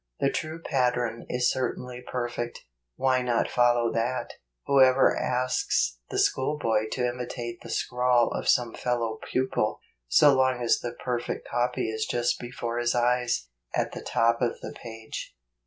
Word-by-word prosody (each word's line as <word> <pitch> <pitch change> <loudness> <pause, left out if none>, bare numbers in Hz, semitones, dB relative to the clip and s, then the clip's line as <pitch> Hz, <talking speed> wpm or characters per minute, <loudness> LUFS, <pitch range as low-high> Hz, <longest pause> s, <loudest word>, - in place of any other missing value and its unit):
The 135 - +2
true 155 +1 -3
pattern 125 -6 0
is 125 0 +2
certainly 125 -1 -3
perfect; 120 -1 -4 0.3
why 130 - +2
not 120 -2 +1
follow 120 -1 +3
that? 120 +3 -1 0.3
Who 140 -1 +4
ever 130 0 +5
asks 125 - 0
the - - -3
schoolboy 130 -6 +1
to 125 - 0
imitate 120 -1 -5
the - - -10
scrawl 125 -1 +2
of - - -2
some 120 -2 +3
fellow 115 -3 -2
pupil, 130 -4 0 0.3
so 145 - +6
long 130 -1 +2
as 115 - +3
the 120 -1 -5
perfect 120 -1 -3
copy 120 0 0
is 110 0 -2
just 120 0 0
before 120 -1 -4
his 120 0 +1
eyes, 120 - +1 0.3
at - - 0
the - - -7
top 115 +1 +1
of 120 -2 0
the - - -6
page 115 -1 -8
120 Hz, 155 wpm, -27 LUFS, 120-125 Hz, 0.3 s, so